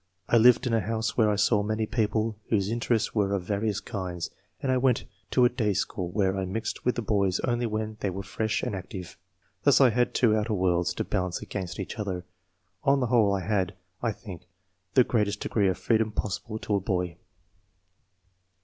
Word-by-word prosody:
I 120 - +4
lived 120 +3 +6
in 120 - 0
a 115 - +4
house 110 +2 -2
where 110 -3 +4
I 105 - +2
saw 105 +1 +3
many 110 +1 -1
people 110 0 0
whose 100 -2 +1
interests 115 -1 0
were 100 -2 +1
of 95 - -3
various 105 +2 -1
kinds, 90 -6 -5 0.3
and 135 - 0
I 130 - +3
went 125 -1 +2 0.3
to 125 - +4
a - - +5
day 110 -5 0
school 90 0 -2
where 95 0 +1
I - - -1
mixed 100 +4 -3
with 125 - +1
the 120 - -2
boys 100 -3 +1
only 120 -1 0
when 110 0 -3
they 100 - -1
were 95 +1 -5
fresh 110 +2 -2
and 125 -5 -2
active. 90 -1 -7 0.5
Thus 145 - +5
I 130 -3 +6
had 120 +2 +1
two 110 -4 +4
outer 110 0 0
worlds 90 -2 +1
to - - -1
balance 90 -1 -2
against 95 -2 -5
each 100 +4 -5
other. 95 -4 -3 0.6
On 140 0 +4
the 125 - +1
whole, 110 -4 +5
I 95 - -2
had, 95 -1 0 0.3
I 115 - +1
think, 95 -5 -10 0.5
the 125 - +7
greatest 105 -4 0
degree 100 -3 +1
of 95 - -1
freedom 110 -1 +1
possible 105 +2 -3
to 110 - -3
a - - 0
boy." 90 -3 -2
105 Hz, 205 wpm, -27 LUFS, 95-115 Hz, 0.6 s, the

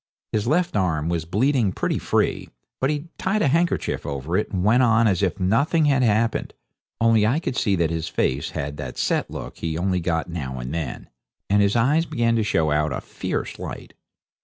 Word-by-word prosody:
His 110 +1 -1
left 175 +3 +1
arm 85 -5 0
was 85 -2 -1
bleeding 115 - +2
pretty - - -1
free, - - 0 0.3
but 135 - +1
he 150 +2 -3
tied 200 +3 +1
a - - +3
handkerchief 170 +5 0
over 70 +4 -3
it 105 - 0
and 90 -2 -2
went 115 +5 +4
on 115 -2 +4
as 95 -4 +1
if 95 -3 0
nothing 140 - +2
had 140 -3 +3
happened, 115 -1 +1 0.4
only 115 -2 +4
I 130 +8 +2
could 145 - -3
see 100 -3 +1
that 85 -3 +1
his 80 -1 -2
face 65 -2 -1
had 70 +1 -4
that - - -6
set - - 0
look - - -8
he 80 -1 -2
only 90 +1 0
got 80 -1 -1
now 70 -7 -5
and 60 +1 -5
then, 80 -6 -4 0.4
and 100 0 +5
his 100 +1 +2
eyes 145 +8 +3
began 115 0 +1
to 110 - +2
show 80 -7 +1
out 75 0 +1
a - - -2
fierce - - -4
light. - - -7
100 Hz, 205 wpm, -23 LUFS, 80-125 Hz, 0.4 s, and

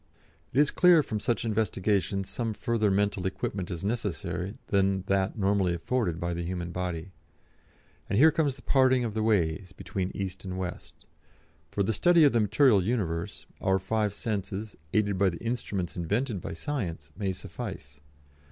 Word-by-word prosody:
"It 130 - +1
is 150 0 +4
clear 180 -1 +6
that 155 - +4
from 110 -5 -3
such 120 +2 -1
investigations 100 -2 0
some 115 -3 -2
further 115 -2 +1
mental 100 -1 +1
equipment 95 -1 -3
is 85 -1 -5
necessary 100 -4 -2
than 95 -1 +2
that 95 +2 0
normally 95 -3 +2
afforded 85 -2 -1
by 85 -1 -2
the 85 - -3
human 85 0 -4
body. 90 0 -4 1.0
And - - +1
here 160 +6 +7
comes 145 -4 +1
the 130 - -17
parting 130 -2 +4
of 110 - -3
the 110 - -1
ways 95 -4 +1
between 95 -1 -3
East 95 -1 -4
and 95 -1 -5
West. 90 -2 -6 0.6
For 100 - 0
the 110 - 0
study 175 - +5
of 145 - +5
the 120 - +4
material 105 -1 +4
universe, 95 -4 -2 0.2
our 95 0 +3
five 105 +1 -1
senses, 105 -1 -3 0.2
aided 100 -3 +1
by 100 -1 +4
the 85 - -5
instruments 105 -6 -3
invented 105 +4 -1
by - - -5
Science, 85 - -4
may 100 0 -1
suffice. 75 -5 -7
100 Hz, 170 wpm, -28 LUFS, 90-115 Hz, 1.0 s, here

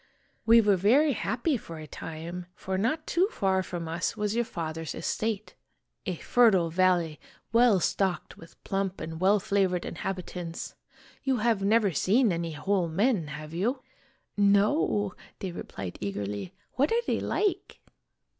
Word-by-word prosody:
We 230 +1 +8
were 205 -3 +3
very 265 - +4
happy 240 - 0
for 165 -7 -9
a 155 - -8
time, 165 +4 -7
for 190 - -4
not 255 +11 0
too 360 +3 +2
far 190 - +1
from 175 -3 -5
us 165 +1 -2
was 210 +1 -1
your 240 0 +1
father's 160 -4 -5
estate 215 -1 -2 0.5
a 185 - -1
fertile 190 -5 +3
valley 175 -3 +2 0.3
well 230 -4 +5
stocked 190 +1 -1
with 165 - -16
plump 195 -1 -2
and 160 +1 -6
well 200 +3 +5
fla 200 +1 0
vored 180 -1 -3
inhabitants. 180 -3 -5 0.5
You 265 -2 +1
have 225 -2 +1
never 210 0 +3
seen 210 - +3
any 170 -1 -2
whole 185 +3 0
men, 195 - +1
have 150 +1 -8
you? 235 +10 -1 0.2
" 270 -1 -34
" - - -52
No," 205 - +3 0.2
they 190 - -4
replied 95 - -7
eagerly. 100 - -4 0.2
"What 280 +4 +1
are 470 +1 +1
they - - 0
like?" 410 -3 -1
195 Hz, 155 wpm, -28 LUFS, 170-225 Hz, 0.5 s, We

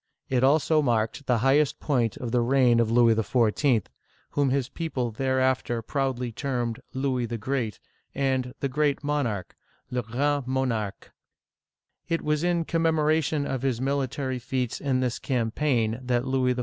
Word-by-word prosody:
It 130 -1 +1
also 155 +3 +4
marked 120 +1 0
the 125 -2 +3
highest 140 +1 +3
point 120 -7 0
of 120 -2 -5
the 120 0 +2
reign 125 -1 +4
of 115 -1 +2
Louis 115 0 +5
XIV., 115 +1 +2 0.5
whom 145 -2 +1
his 130 -1 0
people 135 -5 -3
thereafter 130 -1 0
proudly 130 -2 -2
termed 120 -2 -2
" - - -38
Louis 130 -3 0
the 115 0 -4
Great" 115 -1 -2 0.4
and 130 -2 0
"the 140 - +1
Great 145 +2 0
Monarch 125 -11 -2 0.4
(le 125 0 0
grand 135 +4 -1
Mo 130 0 0
narque). 110 -5 -3 1.0
It 165 - 0
was 150 +1 0
in 175 -1 +1
commemoration 155 -2 +1
of 135 -3 -2
his 130 -4 0
military 135 -1 -1
feats 125 0 -2
in 130 -2 +1
this 125 -2 -1
campaign 115 -2 0
that 125 -1 0
Louis 130 -1 +1
XIV. - - -4
130 Hz, 160 wpm, -26 LUFS, 120-140 Hz, 1.0 s, Louis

